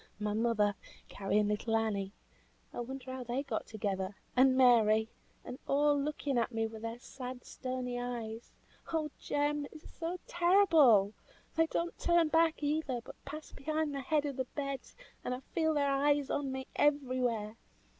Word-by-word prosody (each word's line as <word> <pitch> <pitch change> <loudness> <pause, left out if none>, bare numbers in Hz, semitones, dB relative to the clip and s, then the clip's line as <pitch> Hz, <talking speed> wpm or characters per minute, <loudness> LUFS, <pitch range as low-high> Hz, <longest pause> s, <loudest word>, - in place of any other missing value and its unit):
My 210 0 -1
mother, 215 -2 +2 0.4
carrying 205 +1 +1
little 210 +2 0
Annie 205 -3 0 0.6
(I - - -5
wonder 260 +1 -5
how 260 -1 -5
they 245 +3 -2
got 250 -6 -3
together) 200 -3 -3 0.2
and 260 +1 +5
Mary 220 -4 +5 0.4
and 250 - -7
all 290 +1 +4
looking 285 -2 -1
at 235 - 0
me 225 -1 0
with 220 -1 -7
their 230 +1 -4
sad, 250 0 -8
stony 255 -1 -4
eyes; 235 -2 -5 0.4
oh 310 -2 -1
Jem! 290 0 0
it - - -13
is 310 - -12
so 340 +2 -4
terrible! 330 - +5 0.4
They 325 0 +4
don't 340 +1 -2
turn 345 -2 +3
back 325 -1 +3
either, 290 -4 0
but - - -12
pass 300 +3 -8
behind 310 +1 -2
the 275 - -3
head 295 +2 +1
of 280 -2 -3
the 260 - -1
bed, 275 0 -3 0.4
and 250 - -1
I 255 - -8
feel 320 -2 +2
their 285 -1 +2
eyes 285 0 +2
on 280 -2 -1
me 265 0 -4
everywhere. 250 -7 +1
260 Hz, 165 wpm, -33 LUFS, 225-295 Hz, 0.6 s, and